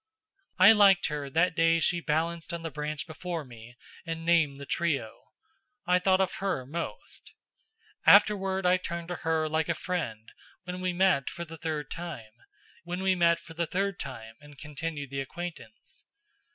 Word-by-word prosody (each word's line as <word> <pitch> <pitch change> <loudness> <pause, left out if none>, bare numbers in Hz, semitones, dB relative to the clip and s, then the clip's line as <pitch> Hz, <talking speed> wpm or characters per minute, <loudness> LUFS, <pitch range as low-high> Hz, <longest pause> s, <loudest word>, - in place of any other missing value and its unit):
I 190 +3 +9
liked 200 -5 +5
her 145 -2 -4
that 165 +4 +2
day 165 0 +4
she 175 +1 +2
balanced 165 +1 -1
on 165 - -7
the 165 - -4
branch 150 -1 -4
before 165 -1 -5
me 120 0 -13 0.3
and 165 -1 -5
named 160 -5 +3
the 140 - -8
trio. 140 -8 -2 0.6
I 180 0 +3
thought 185 +1 +3
of 190 0 0
her 185 -10 -2
most. 170 +6 -7 0.7
Afterward 195 -2 +5
I 180 +1 +5
turned 170 -1 -6
to 175 - -3
her 160 -1 0
like 160 +1 -1
a 170 - +1
friend 155 -12 -4 0.3
when 180 0 -6
we 185 0 0
met 180 -6 +2
for 170 - -6
the 165 0 -10
third 155 -2 -4
time, 165 -11 -7 0.6
and 170 - -1
continued 150 -1 -6
the 135 0 -2
acquaintance. 175 +8 -9
165 Hz, 145 wpm, -28 LUFS, 150-180 Hz, 0.7 s, I